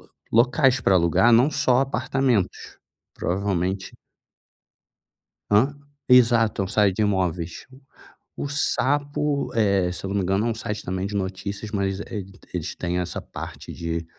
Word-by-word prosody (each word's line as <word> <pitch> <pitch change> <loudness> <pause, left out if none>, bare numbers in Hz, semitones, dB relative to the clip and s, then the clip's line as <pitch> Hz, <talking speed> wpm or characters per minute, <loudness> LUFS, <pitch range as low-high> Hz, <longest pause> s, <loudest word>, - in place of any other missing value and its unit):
lo - - -22 0.2
locais 130 +2 +4
para 95 - +3
alugar 90 +6 +4
não 125 +6 +5
só 125 -3 +2
apartamentos, 135 -5 -1 0.4
provavelmente 95 0 -2 1.6
Hã? 115 +8 +4 0.3
Exato, 120 -4 +4
é - - 0
um - - -6
site 100 -2 +2
de - - +1
imóveis. 90 -5 -1 0.7
O - - -4
Sapo, 145 0 0
eh, 100 -5 +2
se 90 - -6
eu - - -3
não 100 - -3
me 95 - 0
engano, 95 +5 +1
é - - +1
um 115 - 0
site 110 -2 -5
também 95 +1 -3
de 105 - -6
notícias, 100 +2 -4
mas 100 -2 -1
ele 95 -3 -6 0.2
eles 85 -2 -4
têm 90 0 -2
essa 90 - -3
parte - - -9
de 85 0 -4
100 Hz, 150 wpm, -24 LUFS, 95-120 Hz, 1.6 s, não